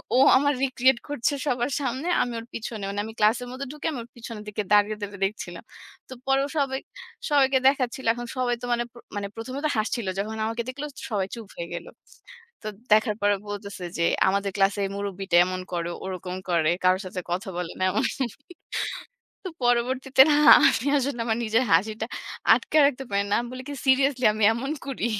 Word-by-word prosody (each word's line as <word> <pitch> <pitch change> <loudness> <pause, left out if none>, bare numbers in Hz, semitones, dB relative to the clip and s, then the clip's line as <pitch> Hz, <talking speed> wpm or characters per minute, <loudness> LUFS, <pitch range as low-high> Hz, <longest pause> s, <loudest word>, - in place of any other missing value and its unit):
ও - - +5 0.2
আমার 285 +2 +2
রিক্রিয়েট 260 -1 +3
করছে 290 -1 0
সবার 245 0 0
সামনে। 265 +5 -2
আমি 245 - -1
ওর 225 - -9
পিছনে। 220 -2 -5
মানে 200 +1 -3
আমি 220 - -8
ক্লাসের 225 +4 +2
মধ্যে 265 +2 -6
ঢুকে 300 +1 -5
আমি 265 - -5
ওর 235 - -17
পিছনের 230 -2 -8
দিকে 210 0 -3
দাঁড়িয়ে, 210 +1 +4
দাঁড়িয়ে 200 -1 -6
দেখছিলাম। 210 +3 -5 0.5
তো 260 - -7
পরেও 270 +1 +2
সবাই, 270 -2 0 0.5
সবাইকে 270 -2 +4
দেখাচ্ছিল। 265 -1 +1
এখন 240 0 -6
সবাই 245 -1 +1
তো - - -4
মানে 240 0 0
প - - -51 0.2
মানে 200 -1 -3
প্রথমে 255 +4 -5
তো - - +2
হাসছিল। 215 0 -1
যখন 215 +2 -3
আমাকে 230 +1 -2
দেখল 275 +3 -6 0.3
সবাই 200 -4 -1
চুপ 225 -3 -9
হয়ে 170 - -4
গেল। 170 - -6 0.8
তো 215 - -3 0.2
দেখার 215 0 +3
পরে 205 0 +3
বলতেছে 200 -2 -6
যে, 170 - +2 0.2
"আমাদের 200 +1 0
ক্লাসে 200 +1 +2 0.2
মুরুব্বিটা 195 -2 -3
এমন 185 0 -3
করে, 170 -1 -2 0.2
ওরকম 185 -1 -5
করে, 165 -3 +2 0.2
কারো 185 +1 +4
সাথে 185 0 -5
কথা 185 +3 -2
বলে 180 -1 -3
না" - - 0
এমন। 205 - 0 1.4
তো - - -3 0.2
পরবর্তীতে 255 +2 +1
না - - +5 0.2
আমি 245 - +3
আসলে 265 -3 -2
আমার 225 0 0
নিজের 225 +3 +2
হাসিটা 215 +6 +2 0.5
আটকায় 310 -1 +2
রাখতে 270 -1 -1
পারি 200 0 +1
না। - - +3
আমি 240 - -6
বলি 255 - -7
কি, 290 - -4
"সিরিয়াসলি 265 -1 +3
আমি 215 - -3
এমন 270 +5 -4 0.2
করি?" 270 -4 -2
230 Hz, 190 wpm, -25 LUFS, 200-260 Hz, 1.4 s, ও